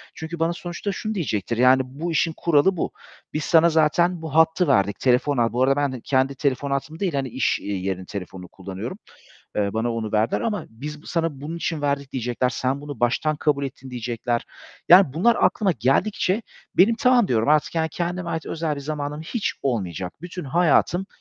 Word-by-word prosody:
Çünkü 160 +1 -6
bana 165 +1 +1
sonuçta 175 +3 -5
şunu 215 +2 -4
diyecektir 115 - -2
yani 130 +1 +5
"Bu 150 +7 -5
işin 160 +1 +1
kuralı 170 +3 +3
bu. - - -2 0.4
Biz 150 -1 -2
sana 165 0 +5
zaten 165 +2 +2
bu 160 -1 -6
hattı 160 +1 +4
verdik. 100 -6 +2
Telefon 130 +2 +2
al" 115 -1 +1
Bu 125 +1 +2
arada 135 +1 +3
ben 140 -3 -1
kendi 135 0 +1
telefon 140 0 -1
hattımı 155 +4 -3
değil, 185 -6 -1
hani, 135 -2 -1
iş, 120 -1 0
eee, 100 - -4
yerinin 95 0 -3
telefonunu 95 -2 -7
kullanıyorum. 95 - -7 0.6
Eee, 100 -1 +1
bana 115 +1 0
onu 110 -2 -4
verdiler 110 +2 +1
ama 210 -7 -2
"Biz 150 +7 -8
sana 165 -5 -2
bunun 160 +4 -5
için 165 -3 -3
verdik." 140 -1 -1
diyecekler. 125 0 -1
"Sen 130 +2 -2
bunu 145 -4 -8
baştan 150 +6 +1
kabul 145 -2 0
ettin." 130 -1 -8
diyecekler. 120 0 -2 0.4
Yani 180 -6 +7
bunlar 215 +10 +3
aklıma 200 -4 +3
geldikçe 185 - +1 0.3
benim 205 +6 +6
"Tamam." 250 -5 +4
diyorum. 115 +2 +1
"artık" 150 +2 +3
yani, 160 -1 +1
"kendime 175 +1 -3
ait 160 - -3
özel 160 -2 -2
bir - - -5
zamanım 150 +1 -4
hiç 210 +7 -2
olmayacak. 95 - -2
Bütün 180 0 -6
hayatım 175 +5 +2
145 Hz, 185 wpm, -23 LUFS, 125-170 Hz, 0.6 s, Yani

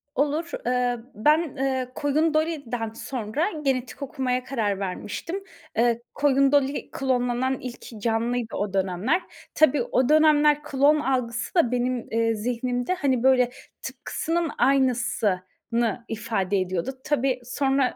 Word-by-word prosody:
Olur. 300 +4 0
Eee, 245 0 +1 0.2
ben, 300 +8 +2
eee, 260 -2 -1
Koyun 305 +3 +1
Dolly'den 285 -8 -1
sonra 250 - -2
genetik 260 -3 -2
okumaya 255 -2 -1
karar 220 -7 -1
vermiştim. 210 - -4 0.3
Eee, 235 0 +2
Koyun 275 -1 +3
Dolly 285 -1 +1
klonlanan 255 0 0
ilk 240 -3 -9
canlıydı 230 +1 -1
o 205 -1 -2
dönemler. 195 - +1 0.3
Tabii, 295 -4 +4
o 255 +2 +1
dönemler 300 -1 +5
klon 290 +1 +3
algısı 250 -1 -1
da 290 -9 +4
benim, 250 0 -1
eee, 225 0 +1
zihnimde 245 +5 -1
hani 270 -8 0
böyle 255 -2 +4 0.3
tıpkısının 330 -1 -2
aynısını 235 -3 0
ifade 210 -3 -1
ediyordu. 185 +5 -2
Tabii, 270 -3 +1
sonra 270 +1 +1
255 Hz, 120 wpm, -25 LUFS, 230-285 Hz, 0.3 s, dönemler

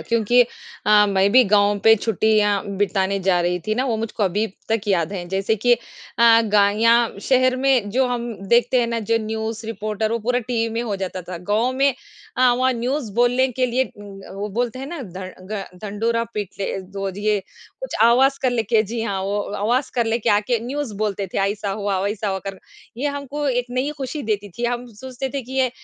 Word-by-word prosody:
क्योंकि 230 +1 +2 0.5
अ, 210 0 +6
मैं 195 0 +3
भी 255 +1 +8
गाँव 205 0 +3
पे 225 0 +8
छुट्टियाँ 210 -1 +2
बिताने 195 -1 0
जा 185 -1 +2
रही 175 +1 0
थी 215 - +1
ना, 255 - 0
वो 240 -4 0
मुझको 220 0 -3
अभी 205 +3 +1 0.2
तक 225 -1 +1
याद 175 -2 +1
हैं, 180 -3 -5
जैसे 195 +4 0
कि 245 +4 +3
अ, - - -11 0.6
गा 205 -2 +4
या 230 0 +6 0.4
शहर 255 -1 +4
में 255 -6 +2
जो 255 +4 +2
हम 240 -1 -3 0.2
देखते 245 +1 +4
हैं 235 - +1
ना, 230 0 -2
जो 225 +1 +1
न्यूज़ 220 +1 -4
रिपोर्टर 215 0 -2
वो 230 - 0
पूरा 245 +3 0
टीवी 230 -1 -1
में 235 - -1
हो 215 -4 -2
जाता 190 -1 -4
था। 175 0 -7
गाँव 230 +5 +2
में 270 +1 +2 0.4
अ, 255 -1 +5
वहाँ 255 +1 +2
न्यूज़ 245 -1 -2
बोलने 245 +2 +3
के 255 +1 +1
लिए, 250 +2 +1
उम 200 -1 -11
अ, - - -10
वो 200 +2 -4
बोलते 245 0 -1
हैं 270 - -5
ना, 330 -2 -6
धं 185 -2 -9
घं 195 -3 -6
ढिंढ़ोरा 230 +3 -1
पीट 205 -3 -2
ले, - - -1
दो 195 +1 -5
ज 190 - -10
ये 210 0 +1 0.4
कुछ - - -5
आवाज़ 260 +4 +5
कर 255 - +3
ले 240 -2 0
के 220 0 +2
जी 225 +2 -4
हाँ, 200 -4 -2
वो 200 +2 -1 0.2
आवाज़ 240 +6 0
कर 240 -2 +2
ले 230 +1 +1
के 225 0 0
आके 210 +4 +2
न्यूज़ 280 -4 -3
बोलते 205 -2 -2
थे, - - +1
ऐसा 205 -1 -4
हुआ, 200 -1 -1
वैसा 205 +2 -2
हुआ 190 -1 -1
करके। 195 +4 -11
ये 290 - 0
हमको 285 +1 -4
एक 245 -1 0
नई 255 +3 -1
खुशी 275 +3 -4
देती 205 -3 -2
थी, 240 - -2
हम 245 +1 -1
सोचते 260 +4 -5
थे 275 - -2
कि 255 - -11
ये 260 -1 +2
225 Hz, 220 wpm, -21 LUFS, 200-245 Hz, 0.6 s, भी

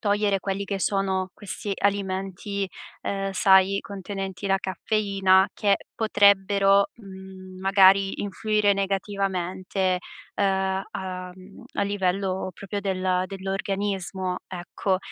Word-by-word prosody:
togliere 205 -2 +2
quelli 195 +1 -2
che 195 0 -3
sono 190 -1 0
questi 205 0 -5
alimenti, 195 0 -1 0.3
ehm, 195 0 -2
sai, 190 +1 +5
contenenti 195 -1 -6
la 195 0 +2
caffeina 195 -1 +2
che 200 -1 +2 0.2
potrebbero, 200 0 +4
mhmm, 190 -3 -11
magari 195 0 +5
influire 205 0 +1
negativamente, 190 -1 -1 0.4
ehm, 190 -1 +1
a 185 -1 -5
mhmm, 190 +2 -14
a - - 0
livello 190 -1 -1
proprio 200 0 -5
del 185 -2 0
dell'organismo, 195 -1 -3
ecco. 185 +1 -2
195 Hz, 105 wpm, -25 LUFS, 190-200 Hz, 0.4 s, sai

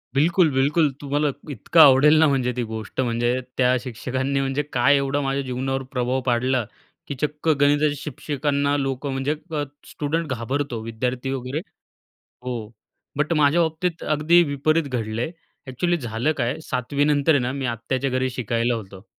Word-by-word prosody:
बिलकुल-बिलकुल. 150 -1 +3
तुम्हाला 145 +1 0 0.2
इतकं 140 +6 0
आवडेल 150 +1 +8
ना 160 - +6
म्हणजे 130 -3 +1
ती 125 - 0
गोष्ट, 110 +2 -4
म्हणजे 120 0 0 0.2
त्या 125 0 +4
शिक्षकांनी 130 +3 -2
म्हणजे 135 +1 0
काय 135 +3 +4
एवढा 140 +1 0
माझ्या 135 0 -1
जीवनावर 135 +1 -2
प्रभाव 125 0 -1
पाडला 125 0 +1 0.4
की 140 - -4
चक्क 150 +1 -3
गणिताच्या 145 0 +3
शिक्षकांना 145 0 -1
लोकं 135 0 -2
म्हणजे 135 +3 -1 0.2
अ, 150 -2 -1 0.3
स्टुडंट 160 +3 -2
घाबरतो 130 +1 -3
विद्यार्थी 125 +3 -3
वगैरे 135 +2 -3 0.8
हो. 120 -4 -5 0.5
बट 150 +3 0
माझ्या 150 +2 +4
बाबतीत 165 +1 -1
अगदी 155 +3 +4
विपरीत 155 +2 +1
घडलं 115 -3 -3
आहे. 140 - -2 0.4
एक्चुअली 175 +7 0
झालं 120 +1 -1
काय, 120 +6 -1
7वी 130 +1 -1
नंतर 145 +1 +2
आहे 140 - +3
ना 125 +1 -1
मी 135 -1 -3
आत्याच्या 125 +3 -2
घरी 130 0 0
शिकायला 120 -1 -1
होतो. 100 -3 -8
135 Hz, 155 wpm, -23 LUFS, 125-145 Hz, 0.8 s, आवडेल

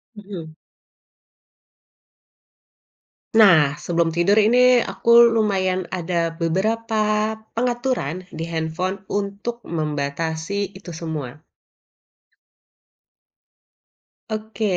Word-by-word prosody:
Mhm. 185 -6 -9 2.8
Nah, 160 -10 +6
sebelum 165 +1 -1
tidur 200 +5 +3
ini 245 +3 +5
aku 235 - -1 0.2
lumayan 190 -4 +1
ada 170 -2 -1
beberapa 215 +4 0 0.2
pengaturan 240 - -2
di 160 +1 -5
handphone 170 +4 -3
untuk 205 +4 -3
membatasi 160 +5 -3
itu 190 -4 -10
semua. 155 -5 -5 3.0
Oke, 220 +1 -5
185 Hz, 70 wpm, -22 LUFS, 165-215 Hz, 3.0 s, Nah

